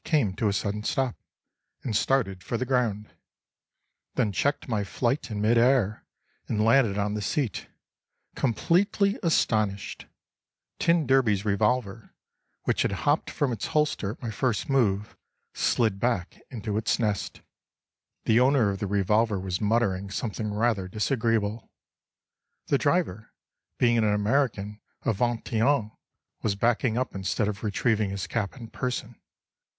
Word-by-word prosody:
came 140 - +1
to 105 - 0
a 100 - +1
sudden 100 +1 -2
stop, 130 +2 0 0.7
and 115 -5 -2
started 100 -7 +1
for 120 - -2
the 130 - -2
ground—then 110 -3 -4
checked 140 +10 0
my 110 -5 0
flight 120 - -1
in 105 -2 -4
mid 115 +3 +3
air 120 -4 +2 0.4
and 105 -1 0
landed 115 -4 +4
on 105 0 0
the 105 - -2
seat, 125 +3 -2 0.7
completely 190 - +1
astonished. 110 - 0 0.7
T 170 -2 +3
d's 120 -6 +2
revolver, 110 +1 0 0.5
which - - +1
had - - +1
hopped 145 +2 +2
from 145 -4 -1
its 110 -4 -3
holster 150 -9 0
at - - -18
my 115 - -3
first 120 0 -1
move, 105 -7 +1 0.4
slid 110 -5 +1
back 115 -7 -1
into 110 -4 -4
its 110 - +1
nest. 105 -5 -2 0.8
The 115 +1 +4
owner 130 -5 +4
of 95 - -5
the 105 - -2
revolver 105 +2 +2
was 95 0 -3
muttering 105 -3 +1
something 105 +1 -3
rather 105 -3 0
disagreeable. 110 0 -1 1.0
The 140 - +3
driver 145 - 0 0.4
(being 120 -1 +3
an - - +2
American 105 0 0 0.2
of 110 - 0
Vingt 120 -1 -1
et 110 - +2
Un) 120 -4 +2 0.5
was 105 -3 0
backing 115 +2 +1
up 130 +1 -1
instead 95 +2 -1
of 105 0 -4
retrieving 110 0 +1
his 100 0 -3
cap 105 -2 -3
in 115 -3 -8
person. 125 -2 -3
110 Hz, 140 wpm, -27 LUFS, 100-125 Hz, 1.0 s, landed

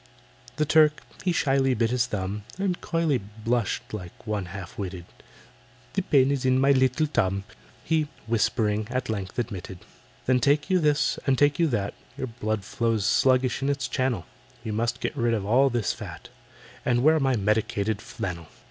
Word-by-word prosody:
The 150 - +1
Turk 150 0 +4 0.2
he 185 - +2
shyly 135 -5 +2
bit 115 +1 +1
his 125 -1 +1
thumb, 100 +1 -3
And 190 -2 -1
coyly 165 -6 +1
blushed 110 +4 -2
like 90 0 -8
one 105 -3 -2
half 90 0 -8
witted, 95 -3 -5 0.9
"The 195 - +1
pain 140 -6 +3
is 140 -2 -1
in 130 0 +3
my 135 +1 +4
little 130 +3 +3
tum," 100 -9 0 0.4
He, 160 -2 +1 0.2
whispering, 110 -1 +1
at 130 -1 -2
length 95 -4 -5
admitted. 100 -6 -4 0.5
"Then 130 0 +3
take 145 - +2
you 185 - +4
this, 150 -2 +2
and 135 -1 +3
take 145 +2 +3
you 170 - +4
that— 105 -8 -1 0.2
Your 135 - -2
blood 110 -4 -3
flows 115 -2 0
sluggish 130 0 +3
in 135 - 0
its 140 -3 -1
channel— 130 0 -1 0.4
You 110 -2 -3
must 115 +2 -1
get - - -2
rid 115 0 +1
of 100 -3 -3
all 130 +6 +4
this 120 -4 0
fat, - - -9 0.5
And 120 0 +2
wear 160 +2 +5
my 135 -2 +2
medicated 105 0 0
flannel. 85 -3 -5
120 Hz, 175 wpm, -26 LUFS, 105-140 Hz, 0.9 s, wear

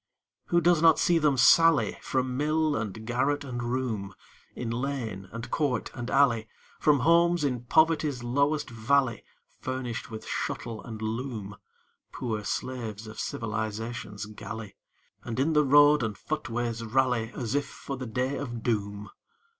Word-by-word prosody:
Who 170 0 +3
does 170 -2 +4
not 165 -2 +6
see 170 -1 +3
them 150 -3 +2
sally 165 +4 +5
From 130 -1 -1
mill, 155 +2 +1
and 110 0 -4
garret, 135 +5 0
and 125 -3 -5
room, 120 -5 -2 0.4
In 115 -2 -4
lane, 115 -7 -3
and 115 +1 -7
court 140 -6 0
and 120 -1 -5
alley, 115 -6 +3 0.3
From 145 -3 +4
homes 170 +2 +4
in 125 -4 -1
poverty's 155 -3 +2
lowest 140 +5 +1
valley, 120 +1 +1 0.4
Furnished 130 -3 -4
with 110 -2 -8
shuttle 115 -2 -4
and 110 -2 -7
loom 110 -3 -4 0.6
Poor 110 -4 -3
slaves 115 -1 -4
of 110 0 -9
Civilization's 110 -1 -4
galley 105 0 -8 0.5
And 115 +1 -4
in 155 +4 +2
the 150 0 +5
road 145 +1 +6
and 110 -3 -2
footways 120 -6 -3
rally, 120 -1 +1
As 120 -1 -3
if 145 -1 0
for 135 - -7
the 130 -1 -6
Day 125 +5 -1
of 120 -4 -5
Doom? 105 -3 -2
125 Hz, 145 wpm, -28 LUFS, 110-145 Hz, 0.6 s, not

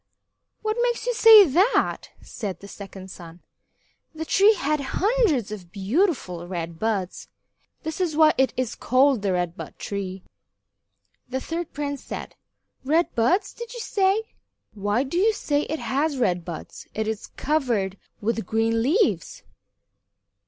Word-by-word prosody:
"What 435 +1 -1
makes 480 -1 0
you - - +1
say 445 -3 +9
that?" 370 - +2
said 200 -5 -6
the 200 - -11
second 195 -2 -10
son. 170 0 -12 0.7
"The 320 +1 -4
tree 405 +6 +5
has 305 -3 0
hundreds 350 - +1
of 185 -5 -8
beautiful 200 - -1
red 170 -2 -5
buds. 205 -5 -2 0.6
This 320 +3 -4
is 335 -4 0
why 310 0 +6
it 265 -3 +2
is 255 -3 -1
called 260 -1 +3
the 200 -1 0
Red 175 -1 -1
Bud - - -9
Tree." 190 -2 -5 1.1
The 260 +1 -2
third 330 +4 -4
prince 285 -1 -4
said: - - -7 0.5
"Red 320 +6 +1
buds, 290 - +1
did 475 +1 -8
you - - -6
say? 400 -1 +1 0.5
Why 205 +4 0
do 280 +6 -2
you 440 +3 +4
say 295 -7 -1
it 315 - -1
has 285 +2 -1
red 180 -8 +1
buds? 165 -2 -8
It 220 0 -1
is 220 -1 -4
covered 235 -11 -1 0.2
with 225 -2 -1
green 225 +1 +1
leaves." 330 - +1
260 Hz, 145 wpm, -24 LUFS, -, 1.1 s, say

